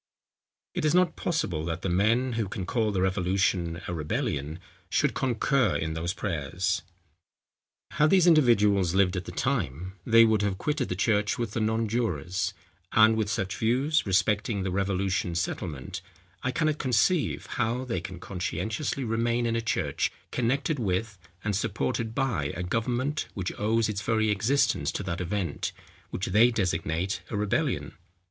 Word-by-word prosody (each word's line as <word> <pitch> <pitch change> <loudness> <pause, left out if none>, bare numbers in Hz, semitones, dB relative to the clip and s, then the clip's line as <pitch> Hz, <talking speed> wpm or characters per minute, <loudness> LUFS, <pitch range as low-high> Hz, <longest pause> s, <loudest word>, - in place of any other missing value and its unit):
It - - -2
is 155 +2 +3
not 180 -2 +3
possible 125 - -1
that 85 +2 -4
the - - 0
men, 115 +8 +2
who 110 -2 -1
can 95 -1 -5
call 110 +2 0
the 95 -2 0
revolution 90 -2 0
a - - -3
rebellion, 75 -1 -2 0.3
should - - +2
concur 130 0 +1
in 80 0 -1
those 80 +2 -2
prayers. 90 -1 -1 1.1
Had 150 0 +3
these 185 -1 +5
individuals 105 - +4
lived 95 -1 +3
at 90 -1 -3
the - - -6
time, 95 - -2
they 115 +2 +6
would 110 -2 +2
have 100 -2 0
quitted 150 +2 -1
the 90 - -1
church 105 +1 +1
with 115 -3 -2
the 115 - -2
nonjurors; 110 - -1 0.4
and 110 +1 +6
with 110 -2 0
such 95 -3 -2
views, 135 +7 +2
respecting 100 +1 +1
the 95 - -2
revolution 95 -2 0
settlement, 80 -5 -3 0.4
I 130 - -1
cannot 155 +2 0
conceive 135 - +1
how 120 +1 -1
they 105 -9 -2
can 90 0 -7
conscientiously 110 - -3
remain 115 +1 0
in 115 0 0
a 115 - 0
church 95 -10 -1 0.2
connected 140 +5 0
with, 100 0 -1 0.2
and 105 -2 0
supported 115 +2 -2
by 120 - 0
a 90 - -3
government 125 +9 -1
which 95 -2 -3
owes 110 +2 +2
its 105 -2 -3
very 110 -2 +1
existence 130 +7 +1
to - - -3
that 90 -2 -3
event, 95 +1 -2 0.4
which 95 - -3
they 110 +6 +5
designate 90 -4 -1
a 105 - -3
rebellion. 105 -1 -1
105 Hz, 155 wpm, -27 LUFS, 90-120 Hz, 1.1 s, they